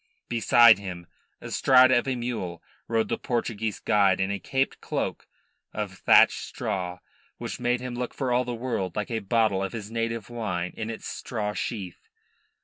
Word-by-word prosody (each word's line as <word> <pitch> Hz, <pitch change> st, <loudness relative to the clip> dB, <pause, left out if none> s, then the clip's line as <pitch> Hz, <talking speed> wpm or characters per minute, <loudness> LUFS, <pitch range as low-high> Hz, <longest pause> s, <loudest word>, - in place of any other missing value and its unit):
Beside 120 Hz, -1 st, +6 dB
him, 90 Hz, -3 st, -7 dB, 0.4 s
astride 130 Hz, -1 st, +5 dB
of 120 Hz, 0 st, +3 dB
a 130 Hz, -, 0 dB
mule, 115 Hz, -9 st, -4 dB, 0.2 s
rode 115 Hz, -1 st, +1 dB
the -, -, -2 dB
Portuguese 110 Hz, -4 st, -2 dB
guide 100 Hz, -3 st, +3 dB
in 95 Hz, +1 st, 0 dB
a 100 Hz, -, -2 dB
caped 135 Hz, 0 st, -1 dB
cloak -, -, -3 dB, 0.5 s
of -, -, -3 dB
thatched -, -, +6 dB
straw, 90 Hz, -2 st, -4 dB, 0.4 s
which -, -, -6 dB
made 125 Hz, 0 st, 0 dB
him 125 Hz, -1 st, -5 dB
look 125 Hz, 0 st, -4 dB
for 130 Hz, -3 st, -1 dB
all 125 Hz, +1 st, +3 dB
the 120 Hz, -1 st, -4 dB
world 115 Hz, -7 st, -3 dB
like 105 Hz, +2 st, -3 dB
a 115 Hz, -, 0 dB
bottle 110 Hz, -1 st, +1 dB
of 95 Hz, -, -4 dB
his 110 Hz, -2 st, -6 dB
native 115 Hz, -2 st, -2 dB
wine 95 Hz, -7 st, -3 dB
in 110 Hz, 0 st, -4 dB
its 115 Hz, -, -6 dB
straw 105 Hz, -4 st, -4 dB
sheath. 100 Hz, -6 st, -5 dB
115 Hz, 170 wpm, -26 LUFS, 100-120 Hz, 0.5 s, Beside